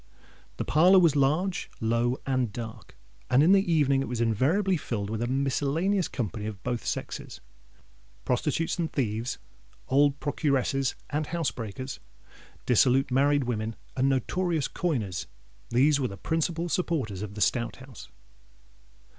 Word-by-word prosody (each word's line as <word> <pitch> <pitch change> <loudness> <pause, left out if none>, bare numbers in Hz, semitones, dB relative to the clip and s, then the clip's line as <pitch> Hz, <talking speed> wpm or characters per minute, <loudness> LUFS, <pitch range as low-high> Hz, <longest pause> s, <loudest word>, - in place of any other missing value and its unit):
The - - -3
parlour 180 +6 +5
was 170 -5 +5
large, 155 +7 +1
low, 115 +3 +1
and 130 -4 0
dark; 115 +1 -8 0.3
and 130 +3 +5
in 170 - +5
the 195 -2 +4
evening 140 -4 +3
it - - -3
was 120 -2 -3
invariably 140 - +2
filled 105 -9 -3
with 110 0 -3
a 120 - 0
miscellaneous 145 +8 0
company 110 -3 -4
of 105 -2 -7
both 120 -2 -2
sexes. - - -4 0.9
Prostitutes 150 +7 0
and 165 -2 -1
thieves—old 120 - -1
procuresses 135 -2 0 0.2
and 150 +1 -1
housebreakers—dissolute 130 - -1
married 140 +2 +3
women, 110 -2 -2 0.2
and 135 +1 +2
notorious 160 +4 0
coiners,—these 115 - -1
were 130 - 0
the 100 - -8
principal 165 - -1
supporters 145 - -1
of 105 -1 -6
the - - -7
Stout 120 +1 +1
House. 130 -3 -12
135 Hz, 130 wpm, -27 LUFS, 115-155 Hz, 0.9 s, parlour